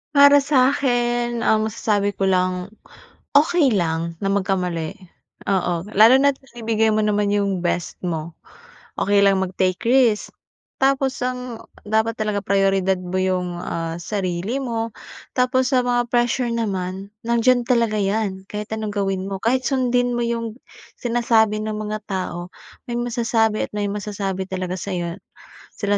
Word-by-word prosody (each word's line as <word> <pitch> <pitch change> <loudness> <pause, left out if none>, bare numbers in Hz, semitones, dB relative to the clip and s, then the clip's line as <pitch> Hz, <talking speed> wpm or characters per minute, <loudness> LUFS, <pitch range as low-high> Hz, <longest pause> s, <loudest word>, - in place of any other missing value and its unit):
Para 285 0 +7
sa 275 -1 +3
akin 240 -2 0
ang 220 -1 +2
masasabi 205 -2 0
ko 195 0 -1
lang, 185 -1 +1 0.7
okey 315 -1 +3
lang 165 -4 -1
na 195 - -3
magkamali. 185 -3 -1 0.5
Oo, 180 -2 0
lalo 225 +6 +7
na't 275 0 +2
binibigay 225 -3 0
mo 215 - +1
naman 205 -1 +1
yung 200 -3 0
best 175 0 -2
mo. 165 -2 -3 0.6
Okey 200 0 +3
lang 195 -1 +4
mag-take 185 0 0
risk. 240 -4 +3 0.5
Tapos 270 0 +2
ang 250 -2 -4 0.2
dapat 220 +2 +1
talaga 210 -2 -1
prayoridad 195 -1 +2
mo 180 0 -7
yung, 180 -2 -1
ah, 165 0 -3
sarili 190 +4 -2
mo. 230 -2 -2 0.5
Tapos 255 0 +2
sa 255 - +4
mga 245 0 +1
pressure 240 0 +1
naman, 195 -4 -3 0.2
nandiyan 240 +1 +3
talaga 235 -3 +2
'yan 195 -1 -1
kahit 210 0 -4
anong 220 -1 -3
gawin 195 -2 -1
mo, 195 - -3
kahit 255 +3 +2
sundin 245 -2 +1
mo 240 - 0
yung 230 -1 -3 0.4
sinasabi 230 -3 +2
ng 215 0 -3
mga 215 0 -3
tao 180 -2 -4 0.4
may 240 - -2
masasabi 230 -2 0
at - - -28
may 205 -1 0
masasabi 200 -2 -3
talaga 185 -1 -3
sa'yo 175 -2 -3 0.6
sila 205 0 0
210 Hz, 145 wpm, -21 LUFS, 190-240 Hz, 0.7 s, Para